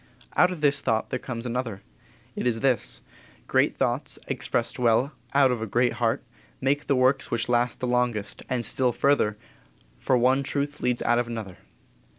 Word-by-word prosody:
Out 180 - +5
of 180 -4 -6
this 140 -1 +3
thought 110 -4 0
there 130 - -1
comes 120 -2 -6
another. 120 -4 -3 0.5
It - - -1
is 115 -2 0
this: 130 -5 +1 0.4
Great - - +2
thoughts, - - -1
expressed - - -1
well, 120 +3 +3 0.2
out 135 -2 +5
of 120 -3 -2
a 110 - -3
great 120 +4 +2
heart, 115 -1 +1 0.4
make 140 +2 0
the 140 - +3
works 130 +2 +2
which 115 -1 -1
last 120 0 +1
the - - -2
longest; 125 -4 -1
and 125 -2 0
still 125 +2 +2
further, 110 -7 +2 0.6
for 130 - +2
one 130 +3 +3
truth 145 +1 -3
leads 125 -1 0
out 120 0 +3
of 120 - -1
another. 110 -6 -6
125 Hz, 175 wpm, -26 LUFS, 115-135 Hz, 0.6 s, Out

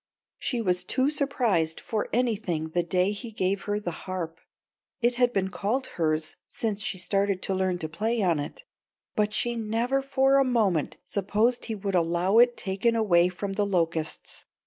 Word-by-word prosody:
She 245 -3 -1
was 180 -3 +1
too 260 +9 +1
surprised 230 - +1
for 215 -2 -3
anything 210 -10 0
the 175 +2 +1
day 180 +3 +1
he 210 +3 -6
gave 195 -2 -1
her 205 0 0
the 180 -4 -3 0.2
harp. 170 -3 -4 0.6
It 240 0 +2
had 245 -1 +5
been 190 -4 0
called 225 +8 -1 0.2
hers 155 0 0
since 215 -3 -2
she 210 - -2
started 195 0 0
to 195 - 0
learn 185 -1 0
to 160 - -4
play 220 +7 -1
on 170 -5 +2
it, 145 - -6 0.5
but 210 0 +1
she 240 +2 0
never 230 +4 0
for 270 0 +3
a - - +5
moment 215 - +1
supposed 215 +5 +1
he 225 - -3
would 200 -1 -3
allow 175 +4 +3
it 240 0 +5
taken 200 +5 0
away 180 -6 +4
from 195 +2 -4
The 205 +1 +1
Locusts. 165 -4 -2
200 Hz, 175 wpm, -27 LUFS, 180-235 Hz, 0.6 s, had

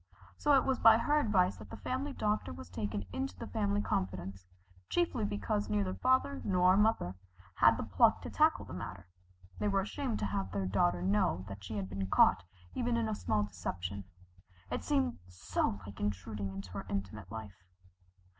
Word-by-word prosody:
So 295 -1 +3
it 270 - +5
was 265 -1 +1
by 225 -1 +8
her 295 +6 +2
advice 190 -8 +2
that - - -11
the - - -8
family 270 +3 -3
doctor 210 - -1
was 85 +1 -10
taken 100 0 -3
into 90 +1 -3
the - - -6
family 100 +1 0
confidence, 95 0 -3 0.4
chiefly 175 -11 +1
because 100 0 -1
neither 100 -3 0
father 95 -2 +1
nor 185 0 +4
mother 210 - +2 0.4
had - - +6
the - - -2
pluck - - +3
to - - -6
tackle - - +3
the - - -9
matter 90 0 -7 0.5
they - - 0
were 195 -1 +2
ashamed 230 +4 -3
to - - -2
have 100 -2 -2
their 95 0 -1
daughter 90 -2 +1
know 95 -2 +1
that 100 -1 -8
she 100 +3 -5
had 95 -2 -2
been 95 +1 -3
caught 90 -1 +5 0.3
in 245 - -2
even 235 -2 +1
a 215 - -1
small 105 - 0
deception 90 0 -5 0.7
it - - -2
seemed 270 -4 +1
so 90 +2 -2
like 100 - -10
intruding 105 0 -3
into 95 -1 -7
her 100 +1 -6
intimate 100 0 -4
life. 105 -4 -8
100 Hz, 185 wpm, -33 LUFS, -, 0.7 s, by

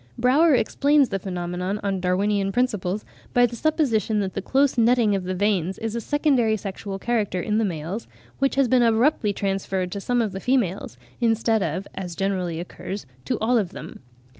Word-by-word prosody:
Brauer 280 +5 +4
"explains 280 +3 +3
the 195 - -2
phenomenon 180 +1 -3
on 195 -2 -1
Darwinian 195 +2 +1
principles 210 -5 -1 0.3
by 245 0 +6
the 235 0 -4
supposition 235 -8 +1
that 190 -1 -3
the - - -3
close 275 0 +2
netting 235 -2 +3
of 190 -2 -1
the 185 0 -2
veins 190 -2 0
is 225 0 -4
a 235 - -2
secondary 265 -6 +2
sexual 195 0 -6
character 210 -3 -1
in 210 +4 0
the 225 - +2
males, 175 +4 -4 0.3
which 275 0 +1
has 275 -2 +3
been 255 0 +4
abruptly 230 -1 +3
transferred 195 -2 -2
to 200 - -4
some 245 +4 0
of 220 -4 0
the 190 - -5
females, 200 - -1 0.2
instead 225 -1 +2
of, 180 +3 -2
as 180 -3 -6
generally 185 -4 -1
occurs, 190 +2 -6 0.2
to - - -1
all 235 +2 +2
of 190 -5 -3
them." - - -9
210 Hz, 185 wpm, -24 LUFS, 190-240 Hz, 0.3 s, by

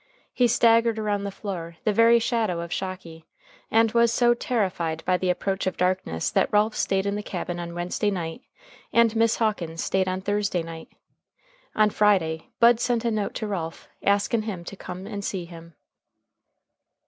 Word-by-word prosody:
He 250 -1 +3
staggered 230 -1 +4
around 205 -2 -1
the - - -2
floor, 175 -5 -6
the 215 - +1
very 230 +2 +6
shadow 220 -7 0
of 170 0 -5
Shocky, 180 -4 -6 0.4
and 225 0 +3
was 235 0 +4
so 240 0 +4
terrified 185 - -2
by 185 - +3
the 180 0 -1
approach 190 +2 -1
of 185 - -2
darkness 180 - 0
that - - +1
Ralph 210 +1 +2
staid 195 0 0
in 200 - 0
the 205 - -3
cabin 175 -3 -5
on 170 0 -6
Wednesday 175 +4 -1
night 175 +2 -4 0.5
and 230 -1 +4
Miss 225 0 +3
Hawkins 175 -8 -1
staid 190 0 0
on 185 0 -2
Thursday 205 -3 -1
night. 165 0 -9 0.9
On 215 -1 +4
Friday, 180 -7 +1
Bud 235 0 +6
sent 240 -1 0
a 235 - +2
note 210 -2 -2
to 215 - -3
Ralph, 165 -5 -5
askin 200 +3 +2
him 205 -5 -5
to 185 - -8
come 185 0 -8
and 200 -1 -6
see 190 -3 -3
him. 170 -1 -13
200 Hz, 175 wpm, -25 LUFS, 175-225 Hz, 0.9 s, very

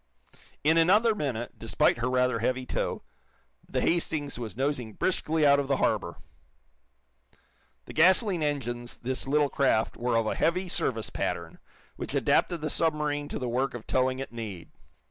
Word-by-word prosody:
In 160 +3 +4
another 210 +7 +4
minute, 130 - -4
despite 115 - +2
her 120 +2 0
rather 125 -2 +1
heavy 125 +3 -1
tow, - - -3 0.7
the - - -1
"Hastings" 150 -6 -1
was 115 -2 -6
nosing 130 -5 -1
briskly 160 - 0
out 140 0 +6
of 140 - -2
the 135 -1 +1
harbor. - - 0 1.7
The - - -10
gasoline 185 +2 +4
engines 120 -5 -3
this 130 +2 -3
little 145 +1 +2
craft 130 -6 +1
were 120 -1 0
of 115 - +1
a - - 0
"heavy 180 +3 0
service" 115 -9 -1
pattern, 85 -1 -3 0.4
which - - -5
adapted 175 -3 +2
the 155 -1 -2
submarine 150 -2 0
to - - -4
the 125 - -3
work 125 +2 -1
of 120 - -8
towing 130 0 +1
at 135 - -6
need. 105 -7 -7
135 Hz, 160 wpm, -28 LUFS, 120-155 Hz, 1.7 s, out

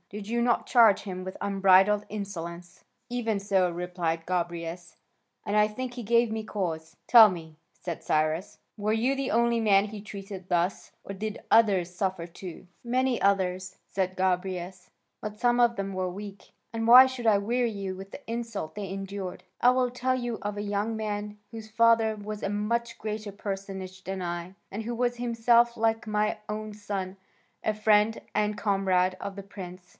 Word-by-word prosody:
Did 205 0 -7
you 235 +2 0
not 235 -1 +2
charge 230 -5 +5
him 185 -2 -5
with 185 0 -7
unbridled 195 +1 +4
insolence?" 175 -4 -7 0.3
"Even 230 -4 -1
so," 195 -2 +2
replied 170 -2 -3
Gobryas, 170 -1 -3 0.5
"and 205 - -1
I 210 0 +4
think 250 +3 -5
he 245 -1 -6
gave 235 +1 +3
me 220 0 -3
cause." 165 -7 -4
"Tell 225 -3 +9
me," 165 -4 -7 0.2
said 170 -3 -5
Cyrus, 155 +4 0 0.2
"were 210 0 -1
you 240 +5 +1
the 275 -1 -2
only 235 0 +2
man 200 -2 +4
he 210 0 -7
treated 195 -2 -9
thus, 175 +1 0
or 200 - -6
did 210 +2 -5
others 195 -6 +4
suffer 185 -3 -2
too?" 180 +1 -10 0.2
"Many 255 +1 +1
others," 185 -1 +1
said 185 -1 -2
Gobryas, 185 0 -2 0.3
"but 210 0 -6
some 245 0 +3
of 235 -1 +3
them 195 0 -3
were 185 -1 -1
weak, 200 +2 -9 0.2
and 225 0 -2
why 250 +2 +11
should 260 -3 -3
I 210 -2 +6
weary 235 +4 0
you 195 -2 -4
with 195 +1 -10
the 285 - -10
insults 230 -8 -4
they 205 -2 -5
endured? 195 -1 -5 0.2
I 245 - +7
will 250 -1 +2
tell 255 +1 0
you 240 -3 -3
of 205 0 -4
a - - -2
young 205 +2 -1
man 210 -1 -4
whose 220 -1 -8
father 225 -1 +3
was 210 0 -6
a - - 0
much 230 +3 -1
greater 215 -1 -4
personage 195 -2 -6
than 190 0 -4
I, 175 +1 -4 0.2
and 210 +3 -4
who 235 +2 -3
was 240 0 0
himself, 235 0 +3
like 225 0 +1
my 210 0 0
own 215 0 -4
son, 195 -2 -4 0.5
a 215 - +1
friend 215 +1 +3 0.2
and 210 0 +1
comrade 190 -3 +1
of 200 0 -6
the 200 - -6
prince. 185 -2 -10
205 Hz, 180 wpm, -28 LUFS, 185-225 Hz, 0.5 s, why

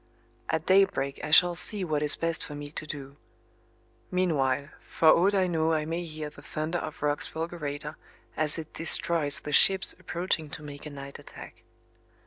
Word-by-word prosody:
At 160 0 -1
daybreak 190 -8 +2
I 150 - -3
shall 175 +3 +7
see 195 +3 0
what 155 -4 -1
is 150 -1 +5
best 165 -1 -2
for 150 - -8
me 145 0 -7
to 155 - -6
do. 140 -1 -7 0.9
Meanwhile, 145 -6 0
for 160 - +2
aught 195 +6 +5
I 190 -1 +3
know 165 -2 +1
I 155 -1 0
may 165 +2 -3
hear 155 -2 -6
the - - -14
thunder 155 +3 -3
of 155 -2 -7
Roch's 145 0 0
fulgurator 155 -2 -5 0.4
as 155 0 +1
it 160 -1 -8
destroys 165 -2 +2
the 150 - -6
ships 190 +5 +4
approaching 170 -3 -2
to 150 - -7
make 145 0 -9
a - - -6
night 140 -1 -9
attack. - - -12
155 Hz, 175 wpm, -28 LUFS, 145-170 Hz, 0.9 s, shall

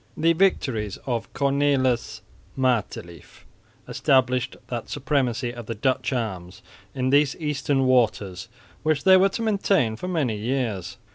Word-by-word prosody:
The 165 +2 +3
victories 130 - 0
of 120 -3 -3
Cornelis 135 -6 +1 0.4
Matelief 110 - -3 0.4
established 130 -2 +1
that 120 -2 -5
supremacy 130 -4 -1
of 120 -2 -9
the 115 - -4
Dutch 130 +3 0
arms 95 -8 -4 0.3
in 130 0 0
these 145 -1 +3
eastern 145 -3 -1
waters 110 -6 +1 0.3
which 155 -1 0
they 190 -1 +7
were 190 +1 +5
to 230 - -4
maintain 195 - +1
for 180 - -6
many 150 -11 0
years. 115 -4 -3
130 Hz, 130 wpm, -24 LUFS, 115-145 Hz, 0.4 s, they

